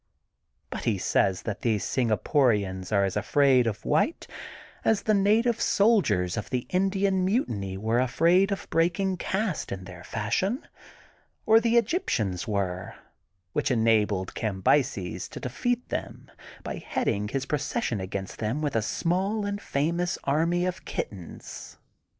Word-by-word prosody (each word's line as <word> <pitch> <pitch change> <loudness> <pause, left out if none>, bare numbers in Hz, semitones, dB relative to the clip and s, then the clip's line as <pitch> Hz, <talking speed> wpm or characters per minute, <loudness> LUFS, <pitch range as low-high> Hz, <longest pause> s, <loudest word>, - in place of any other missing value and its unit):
But - - -5
he - - +2
says 95 -2 +1
that 105 -3 -4
these 110 -6 0
Singaporians 110 - +1
are 100 -2 +3
as 95 - -3
afraid 130 +3 +3
of 110 -2 -4
white 160 - +1 0.6
as 220 -2 +2
the 215 - +2
native 215 +4 +3
soldiers 145 - +3
of 105 - -4
the 125 -2 -2
Indian 195 0 +1
mutiny 110 - -1
were 110 +4 +1
afraid 170 +10 +3
of 195 - -3
breaking 180 +3 +1
cast 190 -1 -2
in 95 -1 -5
their 90 -2 -10
fashion, 150 - -1 0.8
or 220 +1 +7
the 230 +1 +2
Egyptians 115 - 0
were, 95 -4 -2 0.3
— 90 +1 -48
which - - 0
enabled 110 -5 +2
Cambyses 95 - 0
to - - -8
defeat 245 - -2
them - - -5 0.3
by - - -4
heading 105 +1 -1
his 135 +4 -2
procession 145 - -1
against 95 +1 -5
them 115 +6 -1
with 145 -4 -1
a 115 - +3
small 190 - 0
and 205 0 -3
famous 170 +4 -1
army 170 +5 +1
of 185 0 -3
kittens. 90 -5 -7
130 Hz, 140 wpm, -27 LUFS, -, 0.8 s, or